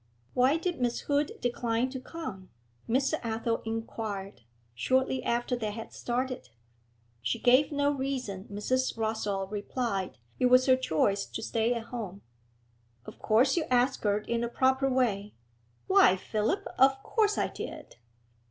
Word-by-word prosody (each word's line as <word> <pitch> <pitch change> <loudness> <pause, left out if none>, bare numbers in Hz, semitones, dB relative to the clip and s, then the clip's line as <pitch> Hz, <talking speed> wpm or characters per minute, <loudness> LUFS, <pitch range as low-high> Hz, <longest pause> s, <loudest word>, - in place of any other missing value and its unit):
'Why 260 +5 +4
did 340 -4 -3
Miss 240 -1 0
Hood 285 0 0
decline 240 0 0
to 260 - -5
come?' 250 - -7 0.4
Mr. 270 +6 +1
Athel 230 0 -1
inquired, 220 - -4 0.3
shortly 260 - +1
after 240 +1 0
they 220 -3 -2
had 225 +2 -7
started. 250 - -3 0.7
She 115 0 -1
gave 255 +5 +4
no 285 0 +2
reason, 260 -8 -3
Mrs. 255 +5 0
Rossall 220 -3 -1
replied. 205 -2 -2 0.2
'It 250 - +4
was 255 +1 +6
her 260 - +6
choice 200 -4 +1
to - - -6
stay 230 +2 +1
at 230 -1 -6
home.' 200 -5 -5 0.8
'Of - - -11
course 245 +5 +3
you 335 -3 0
asked 250 +1 +2
her 205 -1 +2
in 235 +2 -2
a 235 - -1
proper 265 +2 +2
way?' 215 -6 0 0.5
'Why, 385 - +6
Philip, 220 - -1
of 270 +1 +5
course 425 -2 +1
I - - +1
did.' - - -8
245 Hz, 145 wpm, -29 LUFS, 215-265 Hz, 0.8 s, was